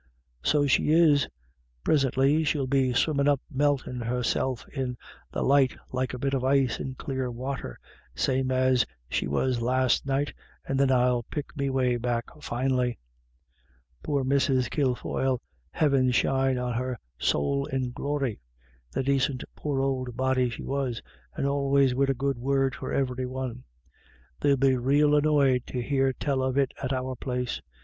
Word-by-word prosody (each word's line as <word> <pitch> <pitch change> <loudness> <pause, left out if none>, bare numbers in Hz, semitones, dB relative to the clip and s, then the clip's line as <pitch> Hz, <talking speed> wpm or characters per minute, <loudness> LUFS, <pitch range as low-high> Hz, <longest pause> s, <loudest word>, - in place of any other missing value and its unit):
"So 145 - +2
she 135 +1 +2
is. 155 -3 +5 0.6
Prisintly 140 +1 +3
she'll 145 -2 0
be 130 -1 +2
swimmin* 140 +2 +2
up 145 -2 +3
meltin' 135 -3 0
herself 125 +1 -1
in 130 -3 -3 0.3
the - - -2
light 135 -1 +3
like 130 0 -2
a - - -5
bit 135 +2 -1
of 130 -2 0
ice 135 -2 +2
in 130 -1 -5
clear 130 -1 -3
water, 125 - -5 0.4
same 130 - 0
as 130 -1 +3 0.3
she - - 0
was 120 - 0
last 130 +2 +1
night, 140 +2 0 0.3
and 135 0 0
then 140 -1 +4
I'll 125 -1 +3
pick 145 +6 -6
me 140 -1 -1
way 130 -2 +1
back 120 -1 -1 0.2
finely. 125 -1 0 1.0
Poor 140 -2 -1
Mrs. 130 -1 +2
Kilfoyle. 130 -2 0 0.3
Heaven 135 - +2
shine 135 +1 +2
on 125 -1 -2
her 125 +1 -2 0.2
sowl 140 - +1
in 130 -2 -2
glory. 140 - -2 0.5
The - - -1
dacint 135 -1 +1
poor 140 -3 -2
old 130 -3 -2
body 130 -1 +2
she 115 - -7
was, 130 -6 -2 0.3
and - - -2
always 140 -1 +2
wid 135 +2 +1
a 135 - +2
good 135 0 -1
word 135 +1 +1
for - - -6
ivery 130 -1 -1
one. 125 -1 -5 0.7
They'll 140 -1 +3
be 135 0 +3
rael 145 +4 +3
annoyed 145 -4 +3
to 125 - -4
hear 135 +1 +1
tell 135 0 -1
of 130 0 -1
it 135 -2 +2
at 130 - -2
our 130 0 -2
place. 125 0 -3
130 Hz, 155 wpm, -27 LUFS, 125-140 Hz, 1.0 s, is